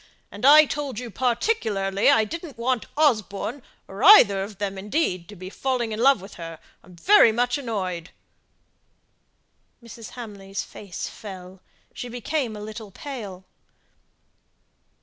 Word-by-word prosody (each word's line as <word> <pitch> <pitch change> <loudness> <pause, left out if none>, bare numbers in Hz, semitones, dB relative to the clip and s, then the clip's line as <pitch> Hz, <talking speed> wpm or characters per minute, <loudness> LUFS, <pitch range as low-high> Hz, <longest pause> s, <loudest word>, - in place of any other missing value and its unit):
And 205 +6 0
I 305 +2 +9
told 285 -4 -4
you 245 -1 -6
particularly 220 - 0
I 220 - +5
didn't 325 +3 -8
want 240 0 -1
Osborne, 230 - 0 0.3
or 195 +4 -7
either 205 - +8
of 200 0 -7
them, 200 -1 -3
indeed, 190 - -2
to 210 - -10
be 185 0 -9
falling 250 -3 -2
in 215 - -4
love 265 -3 +4
with 195 +2 -11
her. 165 -1 -7 0.2
I'm 180 +1 -17
very 355 - +6
much 245 +4 0
annoyed." 185 -9 -4 1.7
Mrs. 230 -1 -10
Hamley's 200 -5 -7
face 195 -4 -7
fell; 185 -2 -10 0.3
she 245 - -7
became 245 0 -3
a 210 - -8
little 215 0 -8
pale. 200 -5 -8
220 Hz, 135 wpm, -24 LUFS, 195-255 Hz, 1.7 s, I